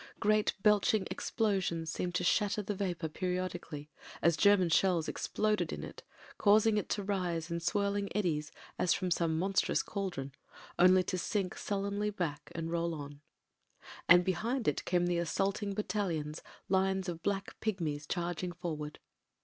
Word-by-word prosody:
Great 215 0 +2
belching 210 -1 +4
explosions 185 -7 -1
seemed 180 +1 -3
to 180 - +1
shatter 205 +3 +2
the 205 - -2
vapour 180 -4 -2
periodically, 180 -3 -4 0.3
as 170 -1 +3
German 200 -1 +5
shells 170 -1 +3
exploded 215 0 0
in - - -5
it, - - -8 0.4
causing 215 +1 +5
it 210 - -2
to 205 - -1
rise 175 -4 -2
in 170 - -1
swirling 200 +3 0
eddies, 155 -7 0 0.3
as 170 - +3
from 185 -2 -2
some 165 -2 +1
monstrous 190 +3 +1
cauldron, 180 -9 -4 0.5
only 185 +1 +6
to 180 +1 -2
sink 190 0 -1
sullenly 200 +1 -2
back 170 -8 -4
and 165 0 -3
roll 170 -1 0
on. 145 -1 -8 0.9
And 180 0 +8
behind 220 +7 -1
it 150 - 0
came 175 -1 +2
the 175 -1 +1
assaulting 195 +4 -1
battalions, 180 -7 -2 0.3
lines 190 0 +1
of 170 -2 -4
black 195 +2 -2
pigmies 160 -9 -2
charging 175 0 -2
forward. 155 -4 -5
180 Hz, 150 wpm, -32 LUFS, 170-200 Hz, 0.9 s, And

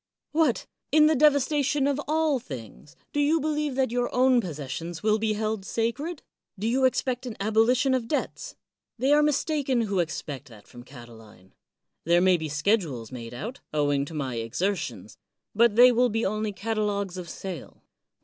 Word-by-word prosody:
What! 300 -6 +1 0.3
in 305 +1 +6
the 310 - +5
devas 285 -2 +4
tation 290 -1 +1
of 285 0 0
all 310 -2 +1
things, 135 - -10 0.2
do 290 - 0
you 300 +3 +3
believe 300 -2 -1
that 260 -3 +1
your 245 0 0
o\^ti 255 -1 +4
possessions 165 - -6
will 215 0 +3
be 215 0 0
held 215 -1 -2
sacred? 255 - -3 0.3
do 205 - -4
you 260 +3 +2
expect 255 0 0
an 230 - -6
abolition 225 +6 +2
of 250 -3 -1
debts? 315 - -3 0.4
They 265 +5 +2
are 300 - +5
mistaken 290 -3 +1
who 200 -5 0
ex 155 -2 -3
pect 140 -2 -7
that 110 -5 -16
from 120 - -12
Catiline. 115 -7 -14 0.5
There 170 +1 +4
may 185 0 +4
be 160 -2 -5
schedules 150 - 0
made 120 -2 -8
out, 230 - -6 0.2
owing 145 -2 +1
to 160 - -9
my 130 -5 -3
exertions, 175 - -3 0.3
but 230 0 +4
they 250 +2 +8
will 245 +1 +3
be 225 +1 -1
only 215 +1 -1
catalogs 200 -1 -2
of 175 -2 -8
sale. 180 -3 -8
220 Hz, 175 wpm, -26 LUFS, 160-265 Hz, 0.5 s, they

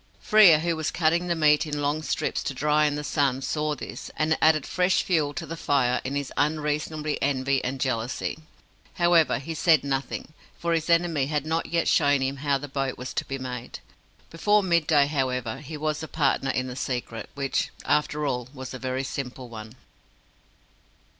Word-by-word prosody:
Frere, 200 -9 +6
who 170 0 0
was 160 -1 -2
cutting 170 +2 +1
the 170 - +1
meat 150 0 +3
in 150 -1 -3
long 145 +2 0
strips 145 - -2
to 135 - -3
dry 150 +3 +2
in 145 - -1
the 150 - -4
sun, 140 -3 +1
saw 150 +1 -1
this, - - -8
and 155 +1 +2
it - - -3
added 155 -3 +4
fresh 180 +1 +1
fuel 155 -6 +1
to - - -4
the 165 - -6
fire 130 -5 +1
in 135 +2 -3
his 140 -2 -3
unreasonable 150 0 -1
envy 135 -1 +1
and 130 +2 -3
jealousy. 125 +3 -2 0.6
However, 170 -6 +4
he 140 +6 -6
said 160 -1 +3
nothing, 140 +2 -3 0.2
for 170 0 -1
his 165 0 -1
enemy 165 -5 +2
had 150 -1 -1
not 160 +1 -1
yet 170 0 0
shown 145 -1 +3
him 135 +1 -1
how 140 0 +1
the 145 +2 -7
boat 135 -1 -2
was 125 0 -6
to - - -2
be 135 - -4
made. 125 -2 -6 0.5
Before 205 +5 +2
midday, 160 -5 +3
however, 130 -4 -2
he 150 +2 -8
was 155 0 -2
a 160 - -5
partner 140 -3 0
in 130 -1 0
the 125 -1 -6
secret, 125 -3 -4
which, 140 -1 -1 0.2
after 150 0 +1
all, 125 -3 -2
was 130 -1 -7
a 130 - -6
very 130 +1 -2
simple 130 -2 -6
one. 110 0 -9
145 Hz, 190 wpm, -26 LUFS, 130-160 Hz, 0.6 s, Frere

